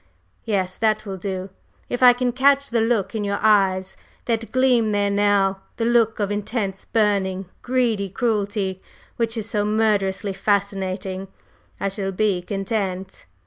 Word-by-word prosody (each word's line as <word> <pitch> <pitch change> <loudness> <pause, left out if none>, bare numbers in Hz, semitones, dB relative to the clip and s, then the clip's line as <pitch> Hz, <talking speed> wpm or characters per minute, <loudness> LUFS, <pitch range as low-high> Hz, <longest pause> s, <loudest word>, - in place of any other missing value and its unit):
Yes, 190 -4 -1
that 215 -1 +1
will 195 -2 -5
do; 190 0 -4 0.4
if 245 - -3
I 250 -1 +9
can 245 0 0
catch 280 +2 +3
the 230 -1 +2
look 220 -4 +1
in 220 -2 -2
your 200 0 -1
eyes 195 -3 +2 0.3
that 230 -1 -2
gleams 250 -4 +3
there 205 0 +1
now, 200 -1 +2 0.2
the 230 - 0
look 230 -2 +3
of 205 -1 0
intense, 205 -2 -3
burning, 195 -3 +1 0.2
greedy 235 -6 0
cruelty 200 -3 -1 0.4
which 230 0 -1
is 220 -1 -3
so 210 -2 0
murderously 210 -2 +1
fascinating, 195 -1 -1 0.5
I - - -1
shall 195 0 -3
be 195 -2 +1
content." 195 -1 -3
205 Hz, 145 wpm, -22 LUFS, 195-225 Hz, 0.5 s, I